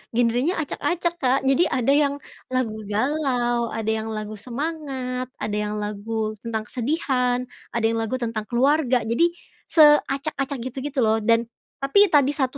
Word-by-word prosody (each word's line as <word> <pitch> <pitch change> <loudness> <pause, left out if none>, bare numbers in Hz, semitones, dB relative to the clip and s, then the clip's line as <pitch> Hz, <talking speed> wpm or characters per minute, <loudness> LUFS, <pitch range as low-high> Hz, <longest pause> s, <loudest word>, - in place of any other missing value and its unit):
genrenya 245 +8 +2
acak-acak, 340 +4 -2
Kak. 260 +1 +3
Jadi, 290 +6 +4
ada 255 +1 +1
yang 285 -1 +3 0.4
lagu 250 -4 -1
galau, 240 0 0
ada 220 0 -1
yang 220 0 -2
lagu 215 0 -5
semangat, 260 -1 -4
ada 210 - -2
yang 210 0 -2
lagu 215 +1 -3
tentang 225 -2 -3
kesedihan, 250 -2 0 0.3
ada 235 - 0
yang 225 0 +1
lagu 225 +2 -2
tentang 230 -3 -3
keluarga. 260 0 +2
Jadi, 335 +10 +2 0.4
seacak-acak, 295 -2 +3
gitu 255 - -17
gitu 285 -2 -3
loh, 220 +1 +3
dan 230 +1 +3 0.4
tapi 400 +10 +5
tadi 285 -2 +4
satu 265 -1 -1
250 Hz, 150 wpm, -23 LUFS, 225-285 Hz, 0.4 s, tapi